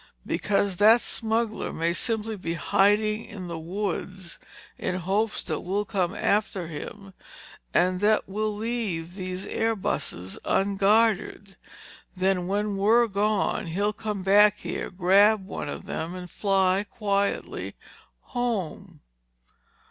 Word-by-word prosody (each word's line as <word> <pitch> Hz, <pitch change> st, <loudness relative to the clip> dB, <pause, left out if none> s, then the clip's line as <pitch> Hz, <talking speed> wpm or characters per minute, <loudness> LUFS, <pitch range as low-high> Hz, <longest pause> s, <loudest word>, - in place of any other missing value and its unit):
"Because 200 Hz, -2 st, 0 dB
that 220 Hz, +4 st, +7 dB
smuggler 225 Hz, -1 st, -1 dB
may 165 Hz, +1 st, 0 dB
simply 220 Hz, +2 st, -2 dB
be 170 Hz, -4 st, -4 dB
hiding 210 Hz, +5 st, +2 dB
in 190 Hz, -4 st, -8 dB
the 165 Hz, -1 st, -4 dB
woods 185 Hz, 0 st, -4 dB, 0.4 s
in 180 Hz, -, -2 dB
hopes 200 Hz, +5 st, -1 dB
that 155 Hz, -4 st, -3 dB
we'll 200 Hz, +3 st, -2 dB
come 185 Hz, -2 st, -1 dB
after 200 Hz, -3 st, 0 dB
him 195 Hz, +5 st, -8 dB, 0.6 s
and 180 Hz, -, +2 dB
that 210 Hz, +2 st, +2 dB
we'll 215 Hz, +2 st, -1 dB
leave 210 Hz, -7 st, -2 dB
these 185 Hz, -1 st, -5 dB
airbuses 195 Hz, -, -2 dB
unguarded. 200 Hz, 0 st, +2 dB, 0.6 s
Then 185 Hz, -1 st, +1 dB
when 205 Hz, +1 st, -1 dB
we're 225 Hz, +5 st, +4 dB
gone, 210 Hz, -2 st, 0 dB
he'll 200 Hz, +6 st, 0 dB
come 210 Hz, -2 st, -4 dB
back 205 Hz, +2 st, +6 dB
here, -, -, -4 dB
grab 195 Hz, +3 st, +4 dB
one 195 Hz, -, -5 dB
of -, -, -6 dB
them 165 Hz, +3 st, -4 dB
and 180 Hz, -1 st, -8 dB
fly 195 Hz, -1 st, +2 dB
quietly 200 Hz, -2 st, -2 dB, 0.5 s
home." 195 Hz, -, -4 dB
200 Hz, 120 wpm, -26 LUFS, 185-215 Hz, 0.6 s, that